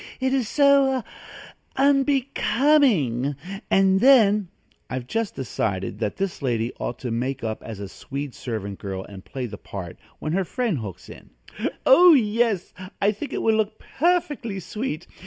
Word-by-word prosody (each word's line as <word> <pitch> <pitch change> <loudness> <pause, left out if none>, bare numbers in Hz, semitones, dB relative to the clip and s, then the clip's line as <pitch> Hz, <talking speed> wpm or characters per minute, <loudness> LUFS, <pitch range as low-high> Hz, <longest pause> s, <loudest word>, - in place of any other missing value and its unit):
It 260 0 0
is 255 -5 0
so 275 -3 +4 0.7
unbecoming, 270 - +2 0.3
and 190 0 +4
then 215 -5 +5 0.2
" - - -39
I've 130 -1 -4
just 225 - -2
decided 100 -7 -3
that 105 -3 -2
this 195 -4 -3
lady 120 -3 -1
ought 120 - -3
to 125 - -3
make 125 +3 -2
up 110 -1 -3
as 110 -3 -8
a 100 - -5
Swede 140 +5 -6
servant 100 -5 -5
girl 95 -1 -5
and 95 -2 -11
play 130 -2 -5
the 100 -4 -8
part, 90 -4 -8 0.2
when 155 - -3
her 195 +2 +1
friend 225 - -1
hooks 95 -5 -8
in: - - -13 0.6
"Oh, 345 +4 +8
yes; 220 -5 +1 0.3
I 200 - +3
think 215 +8 -7
it - - -3
will 225 - +3
look 215 -1 -1
perfectly 295 - -1
sweet! 200 - -4
195 Hz, 155 wpm, -24 LUFS, -, 0.7 s, Oh